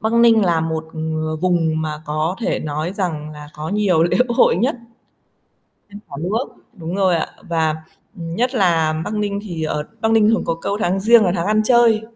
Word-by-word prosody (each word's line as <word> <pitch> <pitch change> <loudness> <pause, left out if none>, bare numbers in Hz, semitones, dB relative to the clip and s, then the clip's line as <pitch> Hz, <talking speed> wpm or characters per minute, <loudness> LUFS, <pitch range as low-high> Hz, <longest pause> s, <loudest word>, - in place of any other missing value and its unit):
Bắc 220 +1 -1
Ninh 235 -2 +5
là 170 -3 +2
một, 160 0 -2
ờ, 155 0 -3
vùng 165 -2 0
mà 155 0 -5
có 155 +4 -1
thể - - -1
nói 155 +3 -3
rằng 160 -6 -3
là 150 -1 -10
có 155 +1 -6
nhiều 195 -5 +2
lễ 170 - +2
hội 235 - +3
nhất 245 +8 0 1.1
trên 205 - -10
cả 140 - -7
nước. 210 +9 -1 0.3
Đúng 170 0 -6
rồi 190 -3 +2
ạ. - - -1 0.2
Và, 160 -2 +1 0.5
ừm, 165 -2 -6
nhất 250 +7 0
là 165 -7 +2
Bắc 215 - -4
Ninh 205 -1 -2
thì 175 -6 -6
ở 150 -1 -2 0.2
Bắc 220 - +1
Ninh 220 -1 +4
thường 225 - +2
có 165 - 0
câu 200 +5 -3
"tháng 190 -1 0
Giêng 225 +2 +5
là 180 - +1
tháng 170 +1 -2
ăn 215 +1 +2
chơi", 235 -2 +4
175 Hz, 205 wpm, -19 LUFS, 160-215 Hz, 1.1 s, Ninh